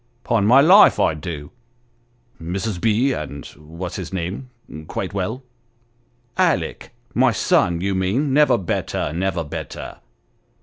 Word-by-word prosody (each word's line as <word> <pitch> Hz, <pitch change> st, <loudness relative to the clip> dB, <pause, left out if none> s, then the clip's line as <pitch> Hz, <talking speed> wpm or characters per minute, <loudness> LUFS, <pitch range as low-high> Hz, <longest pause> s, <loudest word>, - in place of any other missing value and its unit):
" 120 Hz, -, -41 dB
Ton 105 Hz, -3 st, +2 dB
my 130 Hz, +4 st, +7 dB
life, 185 Hz, +8 st, +7 dB
I 80 Hz, -, +3 dB
do! 75 Hz, -2 st, -7 dB, 0.3 s
" 120 Hz, 0 st, -41 dB
" 120 Hz, +1 st, -39 dB
Mrs. 90 Hz, +3 st, -3 dB
B. 115 Hz, +5 st, +2 dB
and 70 Hz, -, -6 dB
what's 85 Hz, +4 st, -8 dB
his 90 Hz, -2 st, -6 dB
name 95 Hz, +8 st, -4 dB, 0.4 s
quite -, -, -4 dB
well? 100 Hz, +7 st, -3 dB, 0.3 s
" 120 Hz, 0 st, -41 dB
" 120 Hz, 0 st, -37 dB
Alick -, -, -4 dB, 0.2 s
my -, -, +3 dB
son, 85 Hz, -1 st, +1 dB
you 100 Hz, +1 st, -1 dB
mean; 105 Hz, +10 st, 0 dB
never 150 Hz, +1 st, +4 dB
better 85 Hz, -4 st, -3 dB
never 90 Hz, -1 st, -1 dB
better. 75 Hz, -, -7 dB
100 Hz, 155 wpm, -21 LUFS, 85-120 Hz, 0.4 s, my